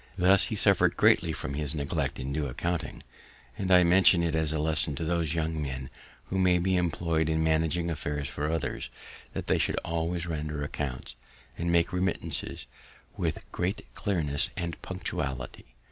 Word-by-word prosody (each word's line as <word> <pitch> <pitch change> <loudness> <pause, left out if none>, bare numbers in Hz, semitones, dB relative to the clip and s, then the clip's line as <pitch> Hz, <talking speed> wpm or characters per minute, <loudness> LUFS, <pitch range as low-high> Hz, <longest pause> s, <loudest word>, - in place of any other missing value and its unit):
Thus 95 +1 +5
he - - -3
suffer'd - - +4
greatly - - +4
from 70 - -4
his 75 +1 -2
neglect 70 -2 -1
in 65 +1 -4
due 75 0 -1
accounting; 85 +6 -3 0.5
and 95 -2 -3
I 90 -1 +8
mention 90 0 +5
it 85 -2 0
as 80 -1 +1
a 80 - -1
lesson 75 -1 +1
to 75 - -4
those 85 -1 0
young 80 -1 -1
men 65 -2 -5 0.4
who 95 - 0
may 90 -1 +4
be 95 +1 +1
employ'd 85 -2 +1
in 80 0 +1
managing 80 +2 +1
affairs 75 -2 -3
for 75 +1 -3
others, 80 -1 -2 0.4
that - - -4
they - - +2
should - - +1
always 85 +1 -1
render 75 -3 -3
accounts, 65 -3 -4 0.4
and 85 0 -1
make 85 0 +2
remittances, 90 +1 -2 0.5
with - - -2
great 95 +5 -2
clearness 80 -9 0
and 85 -1 -4
punctuality. 65 -9 -5
80 Hz, 165 wpm, -28 LUFS, 75-85 Hz, 0.5 s, I